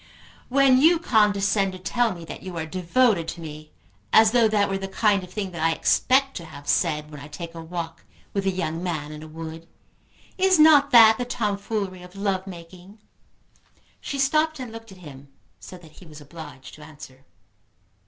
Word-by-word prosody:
"When 265 0 +4
you 335 +3 +5
condescend 205 - +1
to - - -7
tell 225 +6 0
me 170 -1 -10
that - - -9
you 185 -2 -8
are 160 - -3
devoted 185 +2 +1
to 170 - -6
me, 155 -1 -9 0.4
as 220 0 +6
though 235 -2 +4
that 210 -2 +1
were 195 0 -3
the 195 - -5
kind 200 0 +1
of 180 - -12
thing 195 -1 -4
that 170 -2 -7
I 165 0 +2
expect 270 +9 +2
to 170 - -8
have 145 -2 -12
said 150 -3 0
when 150 - -9
I 145 - -10
take 165 +3 -8
a 165 - -8
walk 165 0 -7 0.3
with 195 -1 -2
a - - +4
young 170 -3 -3
man 155 -5 -4
in 150 0 -9
a 155 - -10
wood, 160 +1 -9 0.7
is 375 -1 +4
not 305 -2 +6
that 225 -2 +7
the 245 - -2
tomfoolery 205 -4 -3
of 180 +1 -14
love 195 -1 -2
making?" 180 +3 -12 1.0
She 280 - -5
stopped 305 +3 +1
and 250 -3 -7
looked 225 -1 -11
at 190 - -13
him, 140 -1 -12 0.3
so 185 - -11
that 165 -3 -17
he 175 +2 -16
was 155 -1 -12
obliged 145 -3 -12
to 155 - -13
answer. 145 -3 -13
185 Hz, 195 wpm, -24 LUFS, 160-220 Hz, 1.0 s, that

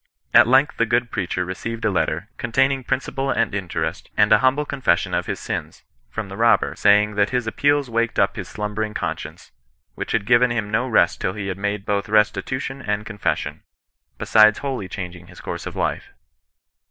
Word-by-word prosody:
At - - +7
length 135 +4 +3
the 115 - +2
good 120 +1 +1
preacher 90 -3 -2
re 90 - -4
ceived 115 +3 -5
a 110 - +2
letter, 90 +1 -1
containing 135 +3 +1
principal 135 +2 -2
and 115 - 0
interest, 95 -4 -3
and - - +4
a - - +7
humble 135 +3 +2
confession 135 -11 0
of - - -1
his - - -3
sms, - - -5 0.3
from 110 -2 -5
the 95 - -8
robber, 115 +2 +3
saying, 105 +1 +4
that 105 0 +2
his 125 -2 -1
appeals 145 +5 +1
waked 115 0 -1
up 100 - +2
his 95 -5 -6
slumbering 105 +1 -4
conscience^ - - -5 0.4
which - - -5
had 110 -3 0
given 120 +2 +4
him 110 -3 -2
no 115 +4 +1
rest 85 -8 +2
till 95 - -1
he 100 -2 -5
had 95 - -4
made 100 0 -2
both 100 0 -1
res 105 0 +4
titution 135 +1 -5
and 105 0 -2
confession, 105 -2 -3 0.6
besides 110 -1 +5
wholly 130 -8 -4
changing 90 -2 -7
his 90 - -14
course - - -6
of - - -7
life." - - -2
110 Hz, 190 wpm, -22 LUFS, 100-125 Hz, 0.6 s, At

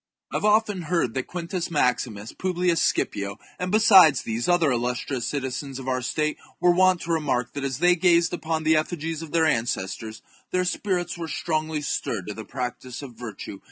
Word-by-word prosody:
I - - +1
have - - -2
often 210 -2 +3
heard 165 -8 0
that 130 -1 -3
Quintus 175 0 -4
Maximus, 125 -8 0
Publius 180 -2 0
Scipio, 100 0 0 0.2
and, 180 0 -2
besides 190 - +7
these, 115 +6 -2
other 175 -5 +4
illustrious 125 +1 -2
citizens 135 -1 -3
of 135 -1 -8
our 130 -1 0
state, 155 +4 -1 0.2
were 175 0 +5
wont 185 0 +4
to 170 - -4
remark 145 -7 0
that 140 - -4
as 135 -2 -2
they 175 +3 +4
gazed 170 0 +3
upon 160 -2 -2
the 160 0 +4
efiigies 160 0 -1
of 160 -2 -8
their 165 0 +3
ancestors 110 -5 -2 0.3
their 185 0 0
spirits 180 -2 -1
were 165 - -4
strongly 155 -1 -2
stirred 110 -8 -2
to - - -3
the 110 - -7
practice 125 +1 -5
of 130 -3 -9
virtue. 110 -4 -8
155 Hz, 185 wpm, -25 LUFS, 125-175 Hz, 0.3 s, besides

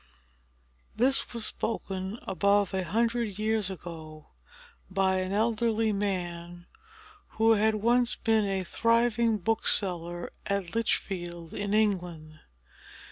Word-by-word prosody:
This 265 +3 +2
was 235 -2 -3
spoken, 195 -2 -3
above 200 +1 +2
a 190 -1 0
hundred 225 +2 0
years 215 -2 +1
ago, 160 -4 -9 0.6
by 190 0 +2
an 185 0 -2
elderly 225 +1 +1
man, 175 -3 -3 0.7
who 225 +1 +5
had 220 0 +3
once 240 +3 +2
been 220 -2 +2
a 195 -1 -1
thriving 230 +2 +2
bookseller 175 -4 0 0.2
at 200 -3 -2
Lichfield, 175 -7 -2
in 205 0 -1
England. 175 -7 -1
200 Hz, 105 wpm, -28 LUFS, 180-225 Hz, 0.7 s, who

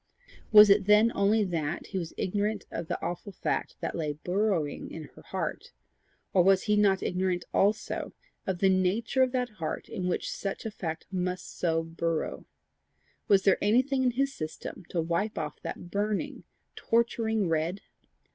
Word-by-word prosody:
Was 210 -1 +10
it 200 -1 +4
then 210 +2 +6
only 210 +2 +3
that 165 -4 -2
he 190 - -2
was 165 -2 -5
ignorant 205 +1 -1
of 165 - -4
the - - -2
awful 175 +4 -4
fact 190 - -2
that - - -2
lay 155 -3 -2
burrowing 175 -1 -1
in 160 - -7
her - - -13
heart, - - -5 0.6
or 185 - +6
was 190 +1 +4
he 210 -1 +2
not 200 -2 +3
ignorant 180 -1 -1
also 210 +2 +1 0.4
of 190 -2 0
the 195 - +3
nature 190 +7 +1
of 260 -1 +4
that 250 -1 0
heart 155 - -3
in 180 - -3
which 180 - -1
such 195 +2 -4
a 220 - -3
fact 165 -6 -5
must 180 -1 -3
so 165 -2 0
burrow? 165 0 -3 0.8
Was 195 -1 +5
there 195 - +4
anything 255 +6 +3
in 255 -1 +3
his 275 0 +1
system 155 +1 -7
to 175 - -2
wipe 170 +6 -1
off 150 -2 -4
that 175 - -7
burning, 205 0 -2 0.3
torturing 225 -3 +1
red? 165 +4 -1
190 Hz, 165 wpm, -29 LUFS, 170-210 Hz, 0.8 s, Was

